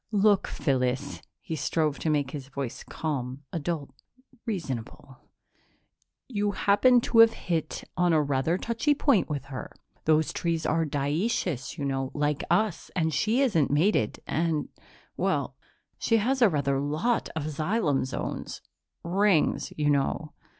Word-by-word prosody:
"Look, 205 -1 +3
Phyllis 130 -1 -1
" - - -58
he 160 - -4
strove 155 -1 0
to 160 - -1
make 145 -4 +1
his 140 -3 -6
voice 140 -3 -5
calm, 140 -3 -4
adult, 160 -2 -3 0.6
reasonable 135 - -5 1.1
"you 205 -4 -1
happened 240 +6 +4
to 230 - +2
have 225 0 +8
hit 165 -3 -3
on 180 +1 +2
rather 145 +1 +1
a - - -3
touchy 235 +6 +1
point 275 - +2
with 145 -2 -3
her. 130 - -6 0.3
Those 155 0 +3
trees 165 -2 -1
are 165 +1 +1
dioecious, 145 - -1
you 145 - -3
know, 135 -1 -1
like 145 -1 0
us, 175 +1 +1
and 160 -3 +1
she 220 - +2
isn't 200 - +2
mated. 165 +9 +2
And, 160 -2 -1 0.5
well, - - 0 0.4
she 230 - +2
has 255 +5 0
rather 145 - +3
a 135 - -1
lot 180 +12 0
of 160 - -2
xylem 155 0 0
zones 130 - -5 0.4
rings, 190 -1 +2
you 150 -1 +2
know." 145 +2 0
160 Hz, 145 wpm, -27 LUFS, 140-205 Hz, 1.1 s, have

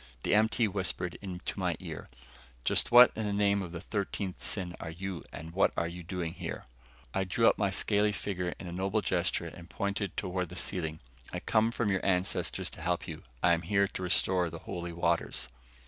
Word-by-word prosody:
The - - +2
MT 110 +2 +4
whispered 95 -2 -1
into 95 -3 -5
my - - 0
ear, - - -7 0.6
"Just - - +2
what 120 +1 +10
in 110 - -2
the 105 - -1
name 100 0 +3
of 90 -3 -5
the 85 -1 -6
thirteenth 100 -2 -3
sin 90 -3 -2
are 80 - -5
you 90 +2 -5
and 80 +1 -7
what 95 - +4
are 85 - +1
you 90 +1 -6
doing 85 -1 -3
here?" - - -5 0.5
I 95 - +1
drew 115 +5 +3
up - - +4
my 100 -2 +3
scaly 105 +2 +2
figure 90 -3 -3
in - - -7
a 85 - -5
noble 95 +4 0
gesture 90 -3 0
and 85 +1 -9
pointed 100 -1 -2
toward 90 -1 -1
the 90 - -9
ceiling. 80 -5 -3 0.3
"I - - -3
come 110 0 +3
from 115 -3 0
your 95 - 0
ancestors 95 0 +1
to - - -9
help - - 0
you. - - -6 0.2
I 85 - +6
am 85 - +1
here 100 +3 +2
to - - -6
restore 90 0 +2
the 80 - -7
Holy 85 -1 -4
Waters." 85 -6 0
95 Hz, 205 wpm, -31 LUFS, 85-100 Hz, 0.6 s, what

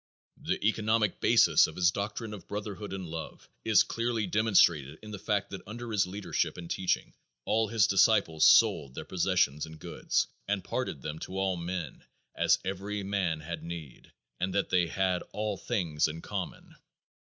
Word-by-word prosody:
The - - -1
economic 110 -2 +1
basis - - +5
of 80 - -9
his 90 -1 +3
doctrine 105 +3 -4
of 105 - -10
brotherhood, 105 0 -5
and 95 -2 -5
love 80 0 -7 0.2
is 110 -4 +5
clearly 115 -2 -1
demonstrated 90 -8 +3
in 105 - -9
the 105 - -6
fact 100 0 -1
that 100 - -6
under 120 +2 -6
his 100 -3 +2
leadership 100 +2 -2
and 85 -1 -7
teaching 95 +2 -1 0.3
all 110 0 +2
his 110 -1 +3
disciples 95 -5 +3
"sold 70 -2 +5
their - - -6
possessions 85 -5 +1
and 80 0 -11
goods, - - -1 0.2
and 100 -1 -1
parted - - -3
them 80 0 -5
to 95 - -6
all 95 -1 +1
men, 85 0 -5 0.3
as - - +3
every 100 +2 -3
man 95 -5 -1
had 80 +1 -6
need," 80 -5 -9 0.3
and 95 +1 -2
that 100 - +1
they 90 -2 +3
"had 95 0 0
all 105 -1 -2
things 85 -10 0
in 80 +2 -6
common." - - -6
95 Hz, 170 wpm, -29 LUFS, 85-105 Hz, 0.3 s, basis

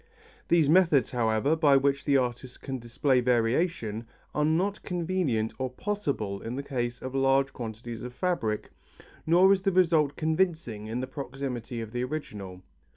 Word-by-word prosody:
These 165 -4 +4
methods, 160 -6 +4
however, 115 +4 +1
by 145 -4 +5
which 140 0 +1
the 140 -2 +4
artist 125 0 -3
can 135 -1 -4
display 125 +3 +1
variation, 120 - 0 0.3
are 150 - +1
not 180 +7 +1
convenient 170 - -1
or 130 0 -1
possible 130 - -3
in 115 +2 -5
the 140 - -4
case 120 -3 -3
of 130 0 -5
large 135 0 +2
quantities 115 0 -6
of 125 - -6
fabric, 125 - -2 0.6
nor 180 +4 +6
is 195 - 0
the 195 0 +1
result 165 -6 +3
convincing 155 - -1
in 115 +3 -3
the - - -2
proximity 130 -3 -5
of 110 -1 -7
the 120 +1 -2
original. 105 -10 -6
135 Hz, 155 wpm, -28 LUFS, 120-160 Hz, 0.6 s, nor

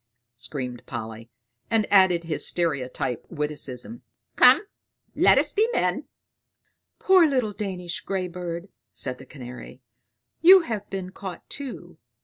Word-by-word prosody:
screamed 125 0 -6
Polly, 115 -1 -7 0.4
and 225 -2 +2
added 185 -3 +5
his 165 -2 -1
stereotype 130 -7 -2
witticism. 150 - -4 0.3
"Come, - - +7 0.5
let - - +5
us - - +1
be 440 +2 +2
men!" - - 0 0.9
"Poor 375 -3 +5
little 255 -7 0
Danish 185 -4 -4
grey 190 -2 -3
bird," 175 +1 -6 0.2
said 130 -1 -2
the 135 - -13
Canary; 125 -2 -10 0.6
"you 370 +3 +9
have 220 -10 -5
been 190 -1 -5
caught 190 -2 -8
too. 180 - -7
175 Hz, 125 wpm, -25 LUFS, 130-205 Hz, 0.9 s, you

